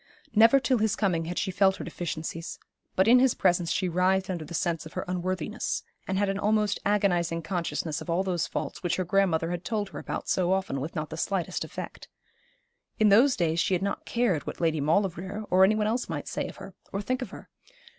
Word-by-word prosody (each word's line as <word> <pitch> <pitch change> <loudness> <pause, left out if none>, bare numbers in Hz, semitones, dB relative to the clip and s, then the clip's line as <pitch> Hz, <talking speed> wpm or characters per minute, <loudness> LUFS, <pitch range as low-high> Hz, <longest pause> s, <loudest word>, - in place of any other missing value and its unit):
Never 225 +5 +7
till 255 -2 +1
his 220 -1 +1
coming 175 -6 0
had 175 +2 -5
she 190 - 0
felt 190 +1 +3
her - - -7
deficiencies; 165 -1 -5 0.4
but 190 +2 +3
in 245 +2 +7
his 260 -1 +3
presence 175 -2 +2
she 185 - 0
writhed 185 +2 +1
under 170 -3 -3
the 170 +3 -7
sense 165 0 -1
of - - -15
her 185 - -3
unworthiness, 185 +3 -2 0.2
and 190 - -1
had 205 +1 +2
an 195 +1 -1
almost 210 0 +1
agonising 175 -5 +1
consciousness 165 -3 -2
of - - -8
all 170 +3 +1
those 180 -3 -1
faults - - -4
which 175 -1 0
her 185 - -1
grandmother 175 -3 +2
had 175 0 -4
told 210 -3 -2
her - - -7
about - - -5
so 185 0 +2
often 190 -8 -1
with 155 +4 -5
not 155 0 -3
the 160 - -5
slightest 185 0 -1
effect. - - -8 0.9
In 215 -1 +5
those 245 +7 +6
days 165 -1 0
she 185 - +2
had 180 - -2
not 200 - -2
cared 230 - 0
what - - -5
Lady 160 -3 +1
Maulevrier 190 +5 0
or 185 +1 +6
any 205 +3 +5
one 215 -1 +1
else 235 +4 -1
might - - -4
say - - -2
of - - -9
her, - - -10 0.2
or 195 - -2
think 255 +4 -1
of 255 - -4
her. - - -11
185 Hz, 225 wpm, -27 LUFS, 170-205 Hz, 0.9 s, Never